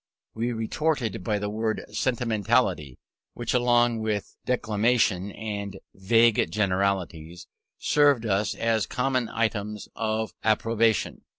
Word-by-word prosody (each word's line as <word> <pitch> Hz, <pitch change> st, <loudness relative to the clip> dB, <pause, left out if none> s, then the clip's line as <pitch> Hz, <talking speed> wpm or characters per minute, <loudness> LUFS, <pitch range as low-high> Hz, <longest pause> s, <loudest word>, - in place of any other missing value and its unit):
We 115 Hz, +2 st, -2 dB
retorted 115 Hz, -, -1 dB
by 105 Hz, +1 st, 0 dB
the 105 Hz, 0 st, -3 dB
word 110 Hz, +1 st, -2 dB
"sentimentality," 110 Hz, -, 0 dB, 0.4 s
which, 120 Hz, -1 st, -3 dB
along 120 Hz, -1 st, +3 dB
with 110 Hz, -2 st, -3 dB
"declamation" 110 Hz, -4 st, +1 dB
and 100 Hz, -2 st, -5 dB, 0.2 s
"vague 115 Hz, +3 st, +3 dB
generalities," 95 Hz, -4 st, -1 dB, 0.3 s
served 145 Hz, -5 st, +3 dB
us 100 Hz, -1 st, 0 dB
as 115 Hz, -3 st, 0 dB
common 125 Hz, -2 st, -1 dB, 0.2 s
terms 105 Hz, 0 st, -6 dB
of 110 Hz, -1 st, -2 dB
opprobrium. 110 Hz, -2 st, +1 dB
110 Hz, 105 wpm, -26 LUFS, 100-120 Hz, 0.4 s, along